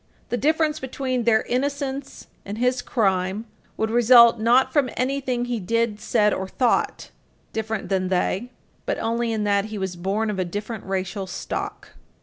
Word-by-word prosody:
The - - 0
difference 310 +3 +1
between 255 -2 -2
their 220 -2 +4
innocence 275 +1 -3 0.2
and 205 +2 -6
his 250 +1 +1
crime 195 -2 0 0.3
would 220 0 -1
result, 235 0 +7
not 240 +4 +3
from 285 -4 +3
anything 255 -2 -1
he 245 -2 -2
did, 225 +2 0
said, 210 0 +2
or 190 - -3
thought, 245 +5 0 0.4
different 220 -1 -3
than 190 -1 0
they, 190 +5 0 0.4
but - - 0
only 230 +1 -1
in 220 -1 -1
that 200 -1 +2
he 215 0 -6
was 190 -2 -3
born 200 +5 -1
of 185 -3 -2
different 205 +3 -5
racial 190 0 -3
stock. 180 - -5
225 Hz, 155 wpm, -23 LUFS, 200-250 Hz, 0.4 s, result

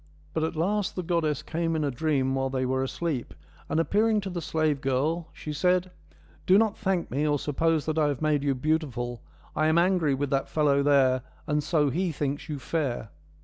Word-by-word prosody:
But 160 - 0
at 160 +1 -2
last 195 +5 0
the 180 - -3
goddess 160 -4 0
came 165 0 -1
in 155 - 0
a 145 - 0
dream 135 -1 0
while 135 0 0
they 130 -1 -1
were 130 +1 0
asleep, 135 -1 -3 0.3
and 160 - +1
appearing 215 +5 +2
to 195 -1 -5
the 175 -1 -3
slave 155 -4 0
girl, 145 +5 0
she 150 - -7
said, 180 +3 +1 0.3
' - - -28
Do 185 - +7
not 220 -1 +2
thank 190 -5 -1
me, 145 +4 0
or 145 -1 +2
suppose 155 +2 0
that 155 0 0
I 150 - +3
have 140 -3 -1
made 150 -2 +1
you 140 -2 +1
beautiful: 125 -5 -1 0.3
I 155 - +2
am 160 +1 +3
angry 170 -5 +3
with 140 0 -2
that 135 0 0
fellow 145 -2 +2
there, 135 -3 +4 0.2
and 150 -1 +1
so 150 -2 +1
he 175 +5 0
thinks 145 -1 -3
you 150 - -3
fair.' 135 -6 -2
155 Hz, 210 wpm, -27 LUFS, 135-170 Hz, 0.3 s, Do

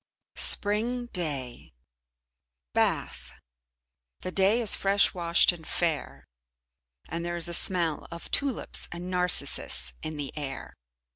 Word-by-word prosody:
Spring 230 +4 +3
Day 140 - -3 1.0
Bath - - -1 0.9
The 185 - -5
day 195 +5 +3
is 225 -4 +7
fresh 200 +1 +2
washed 170 -1 +3
and 165 -3 -11
fair, 165 -4 -2 0.8
and 170 0 -5
there 175 0 -3
is 170 - -1
a 170 - -5
smell 170 -3 0
of 170 0 -9
tulips 275 -4 +1
and 175 +2 -6
narcissus 180 - 0
in 155 -1 -6
the 145 -2 -6
air. 140 -3 -6
175 Hz, 120 wpm, -27 LUFS, 160-195 Hz, 1.0 s, is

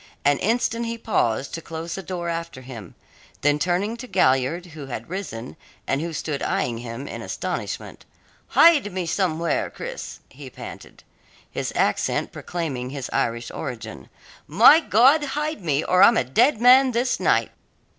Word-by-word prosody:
An 145 0 +3
instant 230 +1 0
he 230 0 -4
paused 140 - -1
to 165 - -4
close 165 +1 -6
the 195 - -5
door 180 -2 -5
after 165 -5 -4
him, 120 -8 -10 0.5
then 145 +1 +2
turning 185 +7 0
to 255 +2 -8
Galliard, 160 - +1
who 145 -3 -8
had 120 +3 -7
risen 130 - -6 0.3
and 135 - -1
who 170 +1 -3
stood 150 -2 -4
eyeing 120 -2 -1
him 120 +3 -7
in - - -7
astonishment - - -5 0.4
"Hide 305 -11 +5
me 180 -1 -3
somewhere, 170 -1 0
Cris," - - -7
he - - -11
panted - - -11 0.5
his - - -3
accent - - 0
proclaiming 140 -8 -4
his 135 -3 -6
Irish 115 0 -1
origin. 115 - -7 0.4
"My 225 - +7
God, 275 - +4
hide 300 -1 -3
me, 150 -2 0
or 185 0 +3
I'm 230 +3 +7
a - - +3
dead 225 - +2
man 255 +2 +6
this 245 +2 0
night!" - - +2
170 Hz, 155 wpm, -23 LUFS, -, 0.5 s, My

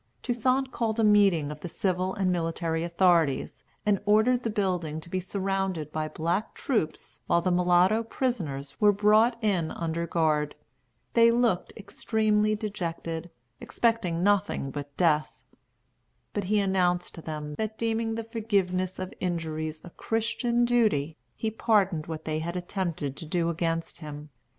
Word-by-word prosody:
Toussaint 255 +2 +1
called 230 -2 -1
a - - +3
meeting 200 -8 +4
of 150 - -8
the 175 - -6
civil 185 +1 -1
and 190 -2 +1
military 165 -1 -1
authorities, 170 -5 +2 0.2
and 205 -2 +2
ordered 220 +4 +4
the 230 - -2
building 180 -7 -1
to 170 +2 -13
be 185 - 0
surrounded 190 -4 -2
by 155 0 -2
black 170 +7 -2
troops 220 - -2
while 170 - +4
the 185 +2 0
mulatto 180 +4 +4
prisoners 180 - -3
were 210 -1 +7
brought 215 +4 +4
in 185 -7 +1
under 170 0 -3
guard. 155 -3 +1 0.6
They 230 0 +6
looked 230 -6 +1
extremely 215 0 +1
dejected, 170 -5 -4 0.3
expecting 185 -8 0
nothing 200 -8 +1
but 145 0 -7
death. 155 -4 +2 0.9
But 205 -2 -2
he 210 +3 +1
announced 180 -3 +1
to 165 - -9
them 150 -2 -5
that, 220 0 -2
deeming 225 0 -1
the 230 - -3
forgiveness 195 -5 -1
of 185 0 -5
injuries 155 -3 -3
a 175 - -11
Christian 235 +3 0
duty, 215 -11 +2 0.2
he 220 - -2
pardoned 200 -8 +1
what 160 -1 -6
they 155 0 -1
had 170 +2 -4
attempted 175 -6 -3
to 160 - -8
do 170 0 0
against 165 0 -2
him. 150 -1 -8
185 Hz, 150 wpm, -27 LUFS, 165-215 Hz, 0.9 s, were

